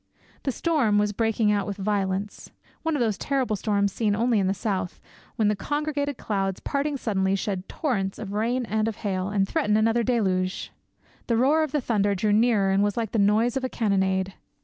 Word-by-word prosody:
The 270 - -1
storm 265 -8 +1
was 210 0 +1
breaking 225 0 +1
out 205 -1 0
with 200 -1 -4
violence; 200 0 -2 0.3
one 325 -1 -1
of 280 - 0
those 220 -4 0
terrible 265 -6 0
storms 200 0 0
seen 210 -3 +1
only 230 0 +2
in 190 - +1
the 190 - +2
South, 190 -3 -3 0.4
when 220 - +2
the 210 - +2
congregated 285 +3 -2
clouds, 195 -3 -2
parting 285 +1 -1
suddenly, 195 -5 0
shed 195 -1 -3
torrents 200 -10 -2
of 200 -2 -6
rain 235 +4 0
and 220 0 0
of 225 - -2
hail, 185 -2 -1
and 200 -1 +1
threaten 215 -8 +1
another 225 +2 +2
deluge. 190 -6 0 0.6
The 230 - +2
roar 285 +6 +4
of 310 -3 -1
the 295 - 0
thunder 205 -4 +1
drew 205 +2 +1
nearer 215 -3 +3
and 195 +1 +3
was 205 +1 0
like 225 -3 -1
the 225 - 0
noise 215 +4 +3
of 265 - -1
a 260 - -1
cannonade. 190 -4 0
210 Hz, 200 wpm, -25 LUFS, 195-240 Hz, 0.6 s, roar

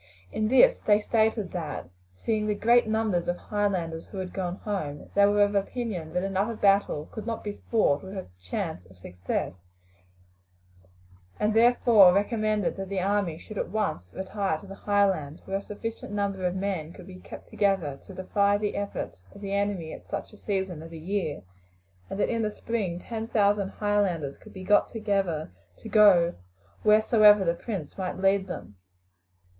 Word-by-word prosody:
In 215 - 0
this - - +5
they 210 -1 +4
stated 220 -2 +1
that, 160 - -5 0.3
seeing 215 - -1
the 210 - +1
great 235 +3 +4
numbers 220 -5 0
of 175 - 0
Highlanders 185 -7 -2
who 200 - -10
had 185 -1 -5
gone 180 -2 -2
home, 185 -9 -5
they 200 0 +5
were 205 0 +4
of 205 0 +1
opinion 200 -5 -2
that 180 - 0
another 195 +4 -1
battle 195 -7 +2
could 220 0 -7
not 230 -1 -3
be 205 -1 -6
fought 210 -11 +3
with 190 +1 -8
a 190 - -5 0.2
chance 90 0 -4
of 95 0 -18
success, 90 0 -4 1.8
and 210 +1 +2
therefore 225 -4 +6
recommended 215 0 0
that 195 -1 -5
the 200 -1 -1
army 195 -3 0
should 210 +4 -8
at - - -2
once 180 - -2
retire 190 -3 -2
to 180 - -13
the 195 - -9
Highlands, 195 -8 0
where 195 0 -1
a - - -5
sufficient 215 +1 -6
number 200 -2 -1
of 180 - -2
men 185 -5 -3
could - - -12
be 185 -1 -11
kept - - -11
together 185 -9 0
to 195 - -9
defy 200 +2 +2
the 210 0 -2
efforts 200 - -5
of 200 - -12
the 200 -1 -4
enemy 200 -5 -1
at - - -12
such - - -5
a - - -13
season 190 -6 -3
of 165 - -9
the 165 - -9
year, 170 - -3 0.7
and 195 - -5
that - - +2
in 230 -1 0
the 215 - 0
spring 210 -6 -3
ten 225 -1 -5
thousand 205 -3 +2
Highlanders 195 -10 -1
could - - -14
be 185 - -9
got 205 +2 +4
together 195 - -1 0.3
to - - -10
go 185 -5 +6 0.5
wheresoever 215 -1 +6
the 170 - +2
prince 190 -4 -6
might 185 -1 -3
lead 195 0 +2
them. 105 - -8
200 Hz, 180 wpm, -27 LUFS, 175-210 Hz, 1.8 s, therefore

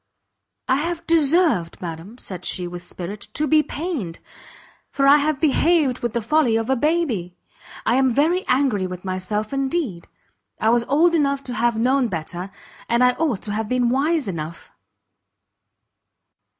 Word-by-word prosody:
"I 260 - +3
have 335 +3 -3
deserved, 310 - +2
madam," 175 +6 -7
said 185 -6 -8
she, 180 -1 -2
with 175 0 -7
spirit, 180 +3 -7
"to 305 - +1
be 310 0 +4
pained, 290 - -4 0.7
for 275 - 0
I 285 +1 +8
have 295 -1 0
behaved 305 -3 +2
with 240 -2 -3
the 235 -2 -1
folly 250 -1 +2
of 225 +3 0
a - - +3
baby. 255 - -1 0.5
I 240 - +3
am 265 -1 +3
very 320 +9 +2
angry 250 -8 +2
with 180 0 -8
myself 200 +5 -3
indeed! 270 - -2 0.5
I 220 - +3
was 235 0 +2
old 330 +6 +3
enough 280 -3 +1
to 250 - -6
have 235 -1 +1
known 255 +2 +2
better, 175 0 -5 0.4
and 235 +1 +3
I 250 - +6
ought 295 -11 0
to 210 - -5
have 215 +1 -2
been 250 -1 +2
wise 290 +3 +1
enough." 165 -3 -6
250 Hz, 160 wpm, -22 LUFS, 195-295 Hz, 0.7 s, I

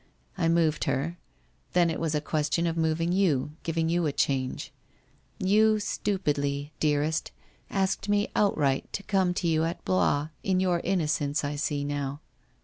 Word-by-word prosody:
I 165 -3 +1
moved 165 -2 +2
her. 140 +6 -1 0.5
Then 175 -2 +4
it 160 - -3
was 160 -2 -1
a 150 - +1
question 155 +2 0
of 165 -1 0
moving 165 +1 +1
you, 165 -7 +2
giving 165 0 -1
you 170 0 +1
a - - 0
change. 130 -2 -1 0.6
You 215 +3 +4
stupidly, 145 -9 -1
dearest, 150 +1 +1 0.4
asked 195 +1 -1
me 205 0 +2
outright 145 -10 +1
to 200 - -3
come 190 -3 +1
to 175 - -1
you 160 -1 +2
at 165 +2 -3
Blois, 155 -5 +2
in 185 -1 +1
your 180 -2 +1
inno 180 -4 0
cence, 145 0 0
I 145 +1 -2
see 145 0 -1
now. 145 -1 -3
165 Hz, 160 wpm, -27 LUFS, 145-185 Hz, 0.6 s, Then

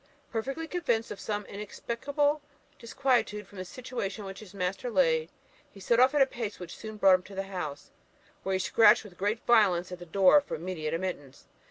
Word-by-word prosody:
Perfectly 270 +8 -3
convinced 245 -10 -1
of 205 - -6
some 210 -1 -3
inexplicable 275 +9 -2 0.4
disquietude 230 -4 0
from 200 - -12
the - - -3
situation 225 -2 -5
in - - -8
which 195 0 -7
his 215 -4 -12
master 195 +5 -2
lay, 165 -6 +2 0.4
he 200 - -14
set 230 +5 +2
off 260 +3 +5
at 285 - +7
a - - +3
pace 230 -5 -5
which 175 -2 -8
soon 215 -1 -8
brought 195 -2 +6
him 185 - +4
to 195 +2 -12
the 195 - -2
house, 180 -7 -6 0.5
where 190 - -2
he - - +2
scratched 215 +4 +5
with 200 -4 -13
great 205 +5 -2
violence 185 -7 +4
at 180 - -6
the 175 - -10
door 195 - +6
for 285 - -5
immediate 165 -2 -3
admittance. 165 -7 -5
205 Hz, 200 wpm, -29 LUFS, 185-235 Hz, 0.5 s, at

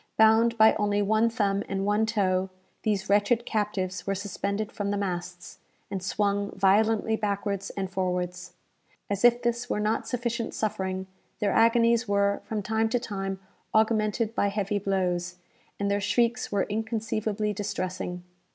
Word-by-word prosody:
Bound 225 +1 +5
by 220 0 +7
only 205 0 +1
one 220 +3 +3
thumb 200 -4 0
and 195 0 -1
one 210 +2 +2
toe, 190 -4 +1 0.3
these 210 -3 -1
wretched 205 +4 +2
captives 190 -5 -2
were 195 - 0
suspended 200 +2 -3
from 205 -1 -3
the 205 - 0
masts, 180 -2 -5 0.3
and 195 -2 -3
swung 200 +1 0
violently 215 +3 +3
backwards 200 -2 -2
and 195 -1 -1
forwards. 180 -1 -3 0.6
As 200 +1 -1
if 240 0 +5
this 240 +1 -1
were - - 0
not 210 +1 0
sufficient 235 -2 -2
suffering, 190 -3 -2 0.3
their 205 -1 0
agonies 230 +1 +4
were, 200 0 +1
from 215 -2 -3
time 220 +2 +1
to 245 - +1
time, 195 -4 -4 0.3
augmented 220 0 +2
by 205 - +1
heavy 205 0 -1
blows, 180 -3 -1 0.4
and 200 0 0
their 200 0 +1
shrieks 235 +4 +1
were 200 -2 +2
inconceivably 220 -1 -2
distressing. 185 -3 -4
205 Hz, 150 wpm, -27 LUFS, 195-220 Hz, 0.6 s, by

